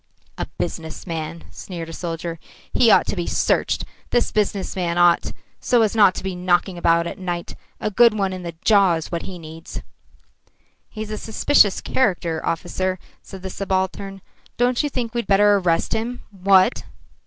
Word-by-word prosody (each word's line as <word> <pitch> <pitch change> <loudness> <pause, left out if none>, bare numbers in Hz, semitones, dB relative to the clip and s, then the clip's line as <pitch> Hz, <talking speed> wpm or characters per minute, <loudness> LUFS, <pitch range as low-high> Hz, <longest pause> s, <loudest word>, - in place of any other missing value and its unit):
"A - - -4
business 160 -1 -5
man," 165 -1 -5
sneered 170 -3 -7
a - - -8
soldier. 165 0 -5 0.3
"He 240 - +4
ought - - +6
to - - -3
be 175 -2 -3
searched, - - +1 0.2
this 240 - +1
business 205 -2 -1
man 175 -2 -1
ought, 175 -1 +4 0.3
so 240 -2 +3
as 215 0 0
not 200 -4 +5
to - - -6
be 190 -1 -3
knocking 180 +1 +1
about 170 -1 +2
at 170 - -6
night. 175 -2 -4 0.2
A 215 - -2
good 235 +1 +5
one 195 -2 0
in 185 - -6
the 170 -2 -7
jaw 200 -5 +5
is 160 - -6
what 170 -1 -2
he 185 - -7
needs." 160 0 -9 1.1
"He's 215 -1 -6
a 215 - -4
suspicious 220 -2 +3
character, 175 -9 0
officer," 185 +2 -2 0.2
said 190 -1 -11
the 190 - -5
subaltern. 195 0 -2 0.4
"Don't 245 0 +2
you 295 - -1
think 240 -4 -3
we'd 235 -4 -2
better 205 +1 +5
arrest 175 -4 0
him, 235 +3 -3
what?" 195 +2 +3
190 Hz, 175 wpm, -22 LUFS, 170-210 Hz, 1.1 s, ought